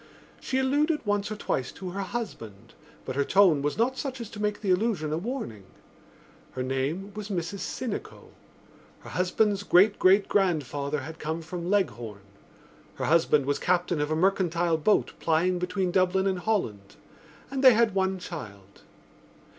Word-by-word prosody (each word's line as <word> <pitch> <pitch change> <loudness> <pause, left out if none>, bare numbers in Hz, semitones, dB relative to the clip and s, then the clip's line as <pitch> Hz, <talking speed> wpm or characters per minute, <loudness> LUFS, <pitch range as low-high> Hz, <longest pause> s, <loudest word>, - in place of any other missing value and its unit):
She 260 - -2
alluded 290 +3 +1
once 205 0 0
or - - -2
twice 130 -10 -2
to 185 -1 -7
her 200 +2 -4
husband 120 - -6 0.3
but 130 - -4
her 140 - +2
tone 185 -4 +4
was 145 +1 -1
not 250 +4 +1
such 265 -2 -4
as 230 -2 -7
to 210 - -7
make 210 0 -1
the 200 -3 0
allusion 180 -6 0
a - - 0
warning. 195 - -5 0.9
Her 130 - -3
name 140 +10 -2
was 210 0 -7
Mrs 190 +1 -3
Sinico. 245 0 -5 0.7
Her - - -11
husband's 195 +3 +1
great 200 +1 +4
great 195 +2 +5
grandfather 145 -6 0
had 160 +4 -9
come 160 +2 -3
from 170 +2 -5
Leghorn. 120 - -1 0.7
Her - - -3
husband 150 -3 +3
was 145 0 0
captain 175 -3 +1
of 150 - -1
a 155 - 0
mercantile 175 -2 +1
boat 205 +7 +2
plying 175 +3 +1
between 180 +1 -1
Dublin 185 +1 +2
and 190 -2 0
Holland; 115 - -2 0.6
and 270 0 -2
they 260 -2 +9
had 230 -3 +3
one 190 0 0
child. 105 - -9
180 Hz, 160 wpm, -27 LUFS, 155-205 Hz, 0.9 s, they